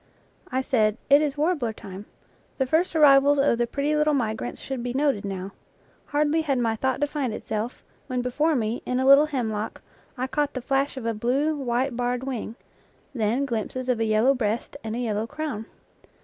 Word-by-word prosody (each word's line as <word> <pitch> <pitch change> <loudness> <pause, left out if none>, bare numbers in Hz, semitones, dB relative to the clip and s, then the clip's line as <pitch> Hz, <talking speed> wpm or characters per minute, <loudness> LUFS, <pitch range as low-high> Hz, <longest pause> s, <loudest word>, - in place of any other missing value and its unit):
I 260 +1 0
said, 220 -5 +2
It 285 +1 +8
is 295 -1 -1
warbler 295 -7 0
time; 200 -1 -10 0.5
the 265 - +1
first 325 +6 +1
arrivals 285 -1 +6
of 275 -4 +3
the 240 - +1
pretty 285 +4 -1
little 300 0 +3
migrants 225 -2 -2
should 265 -3 -5
be 245 0 -3
noted 275 -7 +1
now. 195 -1 -5 0.5
Hardly 300 +2 +1
had 285 -4 0
my 230 -2 +1
thought 260 +4 -1
defined 290 -5 -1
itself, 220 +3 -4 0.2
when 250 -2 -2
before 300 +6 +1
me, 225 -1 -1
in 250 0 -1
a 260 - +1
little 275 +3 +7
hemlock, 225 -7 -3 0.3
I 255 - -1
caught 290 +2 -1
the - - -1
flash 270 +1 0
of 250 - -5
a 230 - 0
blue, 265 +8 0
white 255 -1 -1
barred 245 +1 -1
wing; 250 -4 -4 0.6
then 235 +3 0
glimpses 255 +1 -3
of 245 -3 +1
a 225 - +1
yellow 220 +5 +4
breast 230 -1 -2
and 220 0 -4
a - - -3
yellow 220 -2 -1
crown. 250 -7 -5
255 Hz, 190 wpm, -25 LUFS, 225-285 Hz, 0.6 s, It